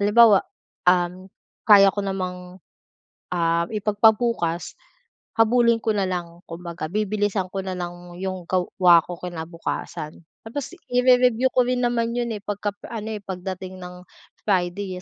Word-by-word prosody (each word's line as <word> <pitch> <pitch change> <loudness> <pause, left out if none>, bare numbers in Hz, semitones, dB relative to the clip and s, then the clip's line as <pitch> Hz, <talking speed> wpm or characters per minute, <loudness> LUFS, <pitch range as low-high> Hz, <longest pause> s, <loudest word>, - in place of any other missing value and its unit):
halimbawa, 210 0 +6 0.5
uhm, 180 +1 +1 0.4
kaya 200 -2 +8
ko 205 - -3
namang, 185 -2 -5 0.7
ah, 170 -1 0
ipagpabukas, 210 -4 +1 0.6
habulin 230 0 +3
ko 225 - 0
na 200 -2 0
lang 175 -2 -4
kumbaga 170 -1 -6
bibilisan 205 -1 -1
ko 195 - -2
na 185 -1 -3
lang 175 -1 -4 0.2
'yong 185 -1 -5
gawa 180 -2 +4
ko 175 -1 -8
kinabukasan. 165 -2 -6 0.2
Tapos 255 +5 -5 0.2
ire-review 250 0 +4
ko - - +3
rin 250 0 0
naman 235 -1 0
'yon, 240 -1 -1
eh, 210 - -5
pagka-ano, 205 +2 -5
eh, 215 -1 -4
pagdating 185 -1 -6
ng 180 0 -10 0.4
Friday 185 0 0
195 Hz, 130 wpm, -23 LUFS, 180-220 Hz, 0.7 s, kaya